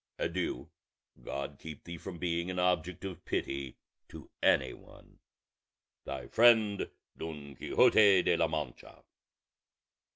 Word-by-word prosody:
Adieu; 85 +1 -2 0.5
God 70 0 -5
keep 80 -3 -9
thee 85 -1 -8
from 90 0 -7
being 85 0 -1
an 90 - -4
object 90 0 0
of 95 -4 -7
pity 70 -2 -3 0.3
to - - -12
any 65 -2 +3
one. - - -17 0.9
"Thy 65 -2 -5
friend 110 - +4 0.3
"DON 75 -3 -7
QUIXOTE 100 - +5
OF 85 - 0
LA 80 - +3
MANCHA." 75 -5 -6
85 Hz, 120 wpm, -31 LUFS, 70-90 Hz, 0.9 s, QUIXOTE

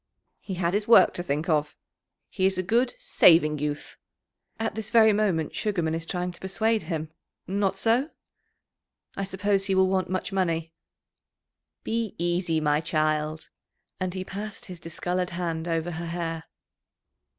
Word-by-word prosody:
"He 190 - -6
had 175 0 0
his 205 +1 0
work 230 - +7
to - - -4
think 155 -2 -2
of; 150 -3 0 0.5
he 190 - +2
is 190 -1 0
a 185 - 0
good, 235 - +1
saving 165 - +5
youth." 145 0 -4 0.6
"At 225 0 -1
this 215 -1 -4
very 220 -2 +6
moment 190 -7 0
Sugarman 175 -7 -1
is 165 0 -3
trying 180 -1 -2
to 175 - -13
persuade 220 +4 +1
him 155 -1 -4 0.3
not 195 +1 0
so? 235 +8 +2 1.1
I 195 - -2
suppose 195 +1 0
he 195 -1 +1
will 190 0 +4
want 190 -1 0
much 185 +2 -2
money." 165 -4 -1 1.1
"Be 225 -2 -2
easy, 175 -1 0
my 150 -1 +2
child." 155 0 -1 0.5
And 185 0 -2
he 185 0 -4
passed 205 +2 -6
his 180 -3 -9
discoloured 180 +2 -2
hand 165 -2 -2
over 165 0 -1
her 170 +1 -5
hair. 165 -1 -4
180 Hz, 155 wpm, -26 LUFS, 165-195 Hz, 1.1 s, work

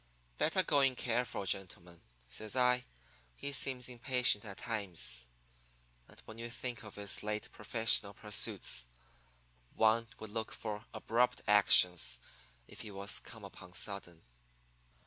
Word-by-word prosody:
"'Better - - +2
go 145 - +2
in 135 -2 +3
careful, 120 -4 -2
gentlemen,' 90 -3 -4 0.3
says 105 - -5
I. 125 -1 +3 0.5
'He 140 - -4
seems 130 -2 +2
impatient 125 -3 +1
at 100 -2 -8
times, 90 - -2 0.8
and - - -15
when 110 +1 -11
you 120 0 -5
think 120 0 -5
of 105 - -12
his 100 -1 -2
late 105 0 -4
professional 105 -2 +2
pursuits 65 - +4 0.9
one 110 +1 +3
would 110 -1 -9
look 110 0 -4
for 105 +1 -6
abrupt 120 +3 0
actions 90 - +5 0.5
if - - -11
he 110 - -8
was 100 0 -2
come - - -12
upon 90 - -12
sudden.' 90 -3 -3
110 Hz, 130 wpm, -34 LUFS, 100-120 Hz, 0.9 s, actions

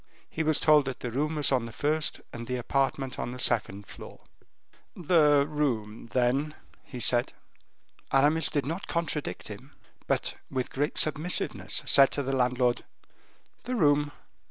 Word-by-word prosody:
He - - -4
was 155 -1 +2
told 150 -2 +5
that 135 -1 -5
the 125 - -4
room 150 +6 -1
was 150 -2 +1
on 125 -3 +1
the - - -9
first, 150 +6 -1
and 115 0 -7
the 125 - -2
apartment 135 +1 -1
on - - -3
the - - -7
second 105 -5 -1
floor. - - -12 0.7
"The 150 -5 +4
room, 120 -8 -2
then," 130 +5 0 0.3
he 125 - -9
said. 120 0 +2 0.8
Aramis 150 +4 +3
did 145 -4 -1
not 165 +6 -4
contradict 165 -3 -3
him, - - -11 0.3
but, - - -1
with 130 -1 -3
great 145 +3 -1
submissiveness, 155 +3 0
said 135 -1 +6
to 145 - -2
the 135 +1 -1
landlord: 125 -1 +1 0.8
"The 255 - -2
room." 145 -6 +3
140 Hz, 155 wpm, -28 LUFS, 125-150 Hz, 0.8 s, said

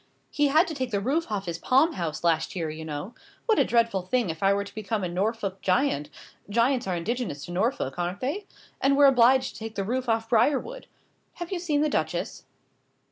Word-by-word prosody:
He 295 -1 +2
had 315 +6 +4
to 325 - -4
take 260 -4 -3
the 205 -4 0
roof 275 +6 -1
off 200 -2 -2
his 170 -1 -4
palm 275 +6 +3
house 165 -3 -4
last 165 0 +1
year, 165 -4 -2
you 160 +1 -7
know. 155 +7 -6 0.3
What 445 -3 +3
a - - +6
dreadful 230 -5 +2
thing 200 +1 0
if 160 - -10
I 195 0 +4
were 200 0 +1
to 200 0 -12
become 215 -1 -3
a - - 0
Norfolk 195 +2 -2
giant 185 - +1 0.4
giants 235 +2 +1
are 185 - 0
indigenous 175 - -3
to 175 - -9
Norfolk, 180 - -1
aren't 175 +3 -2
they? 320 +11 -3 0.3
and 275 +1 +3
were 285 - +7
obliged 260 0 +5
to - - -11
take 220 0 -7
the 195 - -1
roof 250 +4 -2
off 225 0 +1
Briarwood. 275 - +1 0.5
Have 345 0 -7
you 370 - -1
seen 305 -4 0
the 305 - +3
Duchess?" - - -2
225 Hz, 215 wpm, -26 LUFS, 185-270 Hz, 0.5 s, were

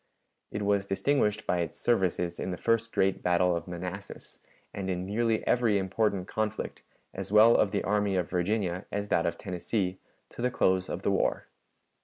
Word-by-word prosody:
It 105 - -4
was 100 -1 +1
distinguished 105 0 +1
by 90 - +1
its 85 -2 -3
services 90 -6 0
in - - -3
the 90 - -3
first 115 +1 +1
great 95 0 +1
battle 90 0 +2
of 85 +1 -4
Manassas, 90 +3 -7 0.3
and 95 -1 -4
in 90 0 -2
nearly 110 +3 0
every 115 -4 +3
important 95 0 0
conflict, 110 0 -3 0.3
as - - -6
well 110 +2 +7
of 105 - +3
the - - -1
army 105 -1 +1
of 90 -2 0
Virginia 90 0 -1
as 100 0 -3
that 85 - +2
of 85 - -2
Tennessee, 95 +1 -2 0.3
to - - -9
the 125 - +2
close 95 -6 +1
of - - -4
the - - +2
war. - - 0
95 Hz, 180 wpm, -29 LUFS, 90-110 Hz, 0.3 s, well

